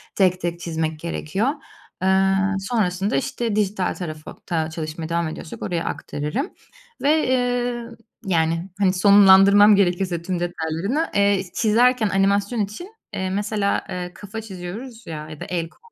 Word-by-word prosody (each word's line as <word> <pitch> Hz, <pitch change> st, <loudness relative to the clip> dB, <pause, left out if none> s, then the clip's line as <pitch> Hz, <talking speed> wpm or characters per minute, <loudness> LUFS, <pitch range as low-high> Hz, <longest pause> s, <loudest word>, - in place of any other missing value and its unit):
tek 185 Hz, -2 st, +2 dB
tek 170 Hz, 0 st, -3 dB
çizmek 160 Hz, -2 st, -3 dB
gerekiyor. 170 Hz, -, -2 dB, 0.5 s
Eee, 190 Hz, 0 st, +3 dB, 0.3 s
sonrasında, 195 Hz, -1 st, 0 dB
işte, 240 Hz, -5 st, -2 dB
dijital 205 Hz, -2 st, 0 dB
tarafa 155 Hz, -4 st, -7 dB
ta 160 Hz, -2 st, -1 dB
çalışmaya 160 Hz, 0 st, -5 dB
devam 170 Hz, 0 st, 0 dB
ediyorsak 155 Hz, +1 st, -8 dB
oraya 170 Hz, -2 st, -2 dB
aktarırım 150 Hz, -, -3 dB, 0.5 s
ve, 305 Hz, +2 st, +3 dB
eee, 245 Hz, -2 st, 0 dB, 0.4 s
yani, 165 Hz, 0 st, 0 dB
hani, 190 Hz, -2 st, +3 dB
sonlandırmam 200 Hz, +1 st, +7 dB
gerekirse 180 Hz, -2 st, +1 dB
tüm 180 Hz, 0 st, -3 dB
detaylarını, 175 Hz, -, -2 dB
eee, 200 Hz, -1 st, +3 dB
çizerken 230 Hz, 0 st, +3 dB
animasyon 200 Hz, +4 st, +1 dB
için, 215 Hz, -, -5 dB, 0.2 s
eee, 190 Hz, 0 st, -2 dB
mesela, 205 Hz, +1 st, -1 dB
eee, 180 Hz, -1 st, -4 dB
kafa 205 Hz, +2 st, -7 dB
çiziyoruz 220 Hz, +4 st, -8 dB
ya 155 Hz, -1 st, -6 dB
ya 155 Hz, -2 st, -9 dB
da -, -, -6 dB
el, 170 Hz, -2 st, -3 dB
kol. -, -, -27 dB
190 Hz, 140 wpm, -22 LUFS, 170-210 Hz, 0.5 s, sonlandırmam